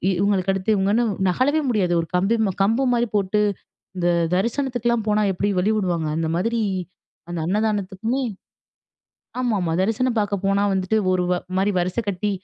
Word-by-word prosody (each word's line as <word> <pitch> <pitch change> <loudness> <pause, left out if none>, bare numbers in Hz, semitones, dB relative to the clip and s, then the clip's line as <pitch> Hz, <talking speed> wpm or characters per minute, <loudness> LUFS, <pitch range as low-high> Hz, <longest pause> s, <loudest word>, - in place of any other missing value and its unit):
இவுங்களுக்கு 195 0 +1
அடுத்து 195 +3 -1
இவுங்கன்னு 200 +4 +2 0.3
நகழவே 285 - +2
முடியாது. 190 -7 +1
ஒரு 165 - -6
கம்பி 195 +6 +2
ம - - 0
கம்பு 225 +7 +2
மாரி 240 0 +1
போட்டு, 200 +1 +1 0.6
இந்த 175 -1 0 0.3
தரிசனத்துக்குலாம் 235 +1 0
போனா 210 0 +2
எப்படி 200 +3 -1
வழி 200 +4 +2
விடுவாங்க, 175 -6 -1
அந்த 165 - -1
மாதிரி 230 +5 0 0.7
அந்த 175 - -4
அன்னதானத்துக்குமே 210 +4 -1 1.2
ஆமாமா. 205 -9 0
தரிசனம் 230 +4 0
பார்க்க 205 -1 -1
போனா 195 +1 +2
வந்துட்டு 190 +3 0 0.2
ஒரு 180 - +1
வ - - +3 0.2
மாரி 195 +2 +2
வரிசை 180 +5 -1
கட்டி, 200 +2 -1
205 Hz, 150 wpm, -22 LUFS, 185-230 Hz, 1.2 s, வ